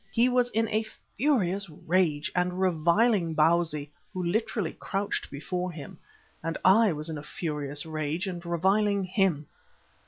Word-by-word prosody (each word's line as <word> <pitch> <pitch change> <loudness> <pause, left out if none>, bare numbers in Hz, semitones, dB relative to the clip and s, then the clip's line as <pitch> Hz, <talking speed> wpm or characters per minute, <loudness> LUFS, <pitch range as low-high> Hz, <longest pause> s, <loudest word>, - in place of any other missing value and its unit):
He 240 +2 +3
was 250 -1 +2
in 225 -1 0
a 215 - +1 0.3
furious 200 - +1
rage 155 -1 0
and 180 0 0
reviling 180 +1 +2
Bausi, 155 -2 +2 0.2
who 185 -3 -4
literally 205 0 -1
crouched 200 +1 -2
before 180 +5 -3
him, 155 -4 -10 0.4
and 165 -1 -3
I 205 +3 +6
was 155 0 -4
in 160 -2 -4
a - - -7
furious 150 -2 -3
rage 155 +3 -2
and 175 -3 -5
reviling 195 +4 +2
him. 185 -5 +1
180 Hz, 145 wpm, -28 LUFS, 155-200 Hz, 0.4 s, I